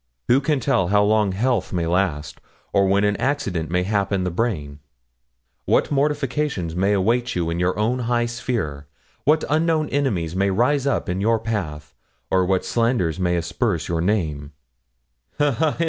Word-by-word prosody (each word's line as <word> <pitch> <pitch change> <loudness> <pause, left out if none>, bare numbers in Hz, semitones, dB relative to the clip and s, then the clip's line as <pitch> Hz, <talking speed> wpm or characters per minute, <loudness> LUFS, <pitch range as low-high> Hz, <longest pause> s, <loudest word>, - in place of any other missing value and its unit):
Who 130 +3 +5
can 145 0 +1
tell 125 -9 +1
how 105 +2 +3
long 105 -1 +2
health 110 +1 0
may 85 -2 -1
last, 85 -4 -1 0.3
or 100 -1 +3
when 100 +1 +2
an 105 0 +2
accident 110 - -1
may 90 +1 +1
happen 100 -1 0
the 90 - -1
brain; 80 -8 -2 0.9
what - - +2
mortifications 140 - -1
may 95 +3 +2
await 120 +5 +1
you 85 -2 -1
in 85 - -2
your 90 +1 0
own 115 +4 0
high 120 0 0
sphere; 110 - -3 0.4
what 155 +3 +3
unknown 155 0 +1
enemies 95 - -1
may 100 +1 +2
rise 130 +8 +1
up 140 - 0
in 90 +2 -2
your 115 +2 +3
path; 85 -11 -4 0.4
or 95 -1 +3
what 95 -1 +1
slanders 115 -9 0
may 90 -1 +1
asperse 85 +1 -1
your 85 -1 -1
name 80 -7 -1 0.8
ha, 145 -1 +3
ha! 150 +5 0
100 Hz, 165 wpm, -22 LUFS, 90-125 Hz, 0.9 s, Who